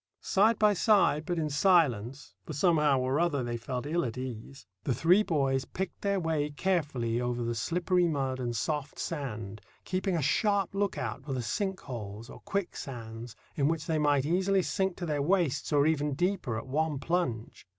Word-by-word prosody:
Side 215 +4 +3
by 210 -1 +4
side, 195 -7 +3
but 175 -1 -1
in 155 -2 0
silence—for 145 - +1
somehow 150 -3 +3
or 130 +3 0
other 160 -6 +1
they 120 0 -3
felt 125 +2 -4
ill 170 +4 0
at 120 -1 -4
ease—the 125 -3 -6
three 175 - +5
boys 135 -8 0
picked 190 0 -5
their 200 -1 +1
way 160 -3 0
carefully 145 -8 -1
over 120 0 -1
the 120 0 -1
slippery 175 - +1
mud 135 -4 -1
and 120 -2 -2
soft 150 +4 -2
sand, 110 - -5 0.2
keeping 185 0 -1
a - - 0
sharp 200 +7 +1
look 200 0 -1
out 120 0 -4
for 135 -1 -4
the 125 -2 -2
sink 190 - -2
holes 115 -2 -7
or - - -11
quicksands, 120 - -5 0.2
in 140 -2 +2
which 160 -1 -1
they 160 -1 0
might 145 -2 +2
easily 185 +4 +2
sink 190 -1 -1
to 180 - -4
their 150 -3 -1
waists, 155 -4 +1
or 145 -1 +4
even 150 -2 +1
deeper, 175 - -1
at 115 - -5
one 150 +2 0
plunge. 130 - -2
145 Hz, 180 wpm, -30 LUFS, 125-175 Hz, 0.2 s, three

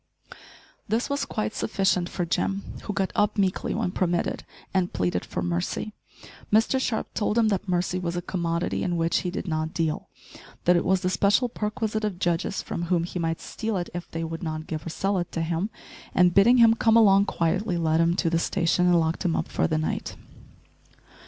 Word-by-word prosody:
This 235 +6 -1
was 280 0 0
quite 215 -1 -3
sufficient 190 -4 0
for 175 - -2
Jim, 195 +3 -1 0.2
who - - -2
got 195 -2 -1
up 210 0 +1
meekly 190 -1 0
when 210 -5 -1
permitted, 175 -2 -1 0.3
and 185 -2 +1
pleaded 90 0 -1
for - - -4
mercy. 85 - -2 0.6
Mr 225 +5 +3
Sharp 235 -4 -2
told 210 +1 0
him 225 -2 +4
that 195 -2 -2
mercy 180 0 0
was 175 -1 -3
a - - -1
commodity 170 -1 -1
in 175 -1 -1
which 165 0 +1
he 180 - -3
did 185 - -5
not 155 -1 -2
deal, 160 -2 -1 0.6
that 180 - +5
it 175 - +1
was 190 0 +2
the 180 - 0
special 205 +6 +3
perquisite 215 0 -2
of 210 -4 -2
judges, 175 +1 -1
from 170 - -4
whom 170 -1 +1
he 180 +1 -4
might 165 -1 -1
steal 220 -3 -3
it 175 - -4
if 175 0 -6
they 165 0 -4
would 165 0 -5
not 155 -2 -4
give 155 -2 -5
or - - -2
sell 195 +3 0
it 175 - -4
to 165 - -1
him, 170 +5 -1 0.5
and, 180 -1 +5
bidding 225 +7 +6
him 230 -2 +7
come 225 0 +3
along 200 -3 +6
quietly, 180 +2 0
led 160 -1 +2
him 170 +1 +2
to 170 -3 0
the 165 - +2
station, 180 0 +1
and 175 -1 +5
locked 160 +2 -1
him 175 -3 +1
up - - -2
for - - +1
the 155 - 0
night. 155 - -3
180 Hz, 205 wpm, -26 LUFS, 165-205 Hz, 0.6 s, him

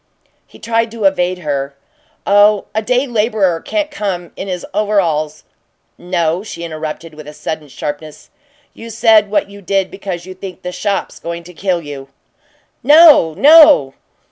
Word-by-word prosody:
He - - -17
tried 230 0 -1
to 225 -1 -7
evade 185 -2 +1
her. 140 -4 -4 0.5
"Oh, 205 0 +4
a 220 - 0
day 250 +4 0
laborer 210 -8 0
can't 310 -1 -3
come 190 - -4
in 195 - -7
his 180 -2 -5
overalls 170 -8 -1 0.3
" - - -48
"No," 175 -1 -1
she 200 -5 -8
interrupted, 155 0 -6
with 150 -1 -12
a 150 - -9
sudden 150 0 -6
sharpness. 150 +2 -8 0.4
"You 230 - -11
said 220 -2 +3
what 200 -1 -1
you 200 0 -12
did 195 0 -1
because 190 -3 -6
you 185 - -9
think 185 0 -10
the 180 - -4
shop's 200 +2 -3
going 170 0 -6
to 180 +1 -13
kill 175 -1 -2
you." 140 -2 -9 0.7
"No, 290 - +6
no!" 295 - +6
185 Hz, 160 wpm, -15 LUFS, 160-215 Hz, 0.7 s, No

